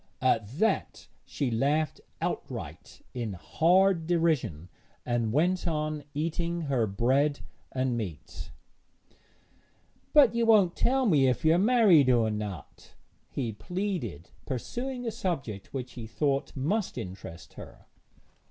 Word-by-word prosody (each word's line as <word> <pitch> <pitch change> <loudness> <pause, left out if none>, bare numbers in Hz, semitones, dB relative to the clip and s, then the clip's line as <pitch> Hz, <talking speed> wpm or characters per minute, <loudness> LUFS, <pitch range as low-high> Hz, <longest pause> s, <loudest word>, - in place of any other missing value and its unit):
At 115 -5 +2
that 225 +5 0 0.2
she 135 -5 -2
laughed 145 +6 0 0.2
outright - - -5
in 115 -5 -3
hard 170 - +2
derision, 150 - 0 0.4
and 120 -2 0
went 175 +7 +1
on 155 -2 -2
eating 170 +2 -2
her 135 -7 0
bread 130 +8 +1 0.3
and 130 -1 0
meat. 95 -10 -6 1.6
'But 285 -7 +7
won't 220 -6 +4
you - - -3
tell 265 +1 +3
me 145 - +4
if 130 +5 0
you 160 - +6
are 170 - +3
married 200 - +5
or 115 -3 +3
not?' 105 -5 -7 0.3
he 125 -5 -3
pleaded, 120 - -4 0.2
pursuing 245 - -4
a 230 - -1
subject 135 - -4
which 130 -2 -5
he 115 -3 -8
thought 140 +3 -1
must 180 +11 -1
interest 90 -2 -8
her. - - -12
145 Hz, 125 wpm, -28 LUFS, 115-180 Hz, 1.6 s, But